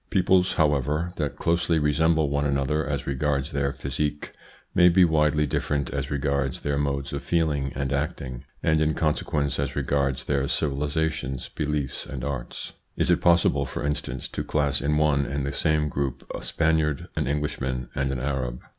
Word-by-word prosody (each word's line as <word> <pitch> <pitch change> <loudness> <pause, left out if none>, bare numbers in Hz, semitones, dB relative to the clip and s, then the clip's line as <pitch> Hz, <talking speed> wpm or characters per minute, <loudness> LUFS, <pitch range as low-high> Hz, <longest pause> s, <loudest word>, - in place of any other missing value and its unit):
Peoples, 95 -1 +3
however, 75 +2 +1
that 75 -3 -2
closely 85 0 +1
resemble 80 +1 +3
one 70 +1 0
another 70 +2 +1
as - - -2
regards 70 +1 -1
their 70 -1 0
physique, 70 +2 -3 0.4
may 90 - +7
be 90 +1 +6
widely 75 -2 +3
different 70 0 -1
as 70 0 -3
regards 70 -2 -1
their 70 -1 -1
modes 70 -1 -1
of - - -3
feeling 75 -5 0
and 70 +1 -1
acting, 70 -3 -3 0.2
and 80 -1 +3
in 80 0 +2
consequence 75 -2 0
as 70 -1 -2
regards 70 -1 0
their 70 -1 0
civilisations, 70 -2 -1
beliefs, 75 -2 -2
and 70 -4 -6
arts. 65 -3 -5 0.2
Is - - +2
it - - +3
possible, 85 -5 +4
for - - -4
in 75 - +2
stance, 65 -3 -5
to - - -3
class 70 -2 0
in 75 +2 +1
one 70 -2 +2
and 70 0 -2
the 70 - -3
same 75 0 +1
group 70 -3 -3
a - - -5
Spaniard, 80 -3 +1
an - - -1
Englishman, 65 -4 -2
and 70 0 0
an 65 -1 -2
Arab? 65 -2 -2
70 Hz, 170 wpm, -25 LUFS, 70-75 Hz, 0.4 s, may